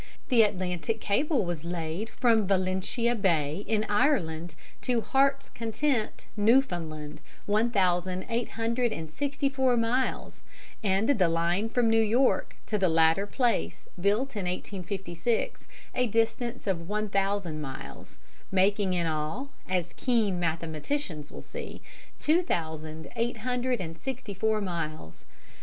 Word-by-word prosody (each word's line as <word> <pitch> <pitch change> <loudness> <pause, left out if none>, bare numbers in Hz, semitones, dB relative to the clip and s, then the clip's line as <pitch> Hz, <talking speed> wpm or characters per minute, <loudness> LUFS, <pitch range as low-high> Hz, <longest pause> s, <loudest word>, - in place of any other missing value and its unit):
The 240 -3 +6
Atlantic 190 +1 0
cable 240 - +1
was 170 -3 -3
laid 170 +4 -3
from 225 -6 +3
Valentia 190 +5 +1
Bay 170 -5 +1
in 215 -1 +2
Ireland 175 - +1 0.3
to 245 -3 +1
Heart's 275 +4 +2
Content, 230 +1 -1
Newfoundland, 175 - +1 0.2
one 215 +3 +2
thousand 185 -3 +1
eight 235 0 -1
hundred 235 +1 0
and 160 -6 -5
sixty 280 - -1
four 265 -2 +2
miles, 240 +3 0 0.4
and 200 +2 +2
the 220 -11 +4
line 170 +6 +1
from 240 0 +2
New 225 0 +5
York 235 +5 +2
to 210 - -1
the 185 -2 +3
latter 165 +4 +4
place 240 +2 0
built 210 +8 +1
in 200 -3 -2
1856, 190 +2 -3 0.3
a 250 -1 +2
distance 225 +2 0
of 175 -3 -1
one 210 +1 0
thousand 195 -5 0
miles, 135 -3 -8 0.3
making 195 0 +3
in 170 -1 +1
all, 160 - -2 0.2
as 180 -2 -1
keen 220 -8 +1
mathematicians 165 - -2
will - - -9
see, - - -7 0.4
two 320 +4 +3
thousand 160 - -3
eight 235 +1 0
hundred 250 0 0
and 165 -2 -6
sixty 260 -5 -5
four 215 +2 +1
miles. 160 - -5
205 Hz, 135 wpm, -28 LUFS, 170-235 Hz, 0.4 s, The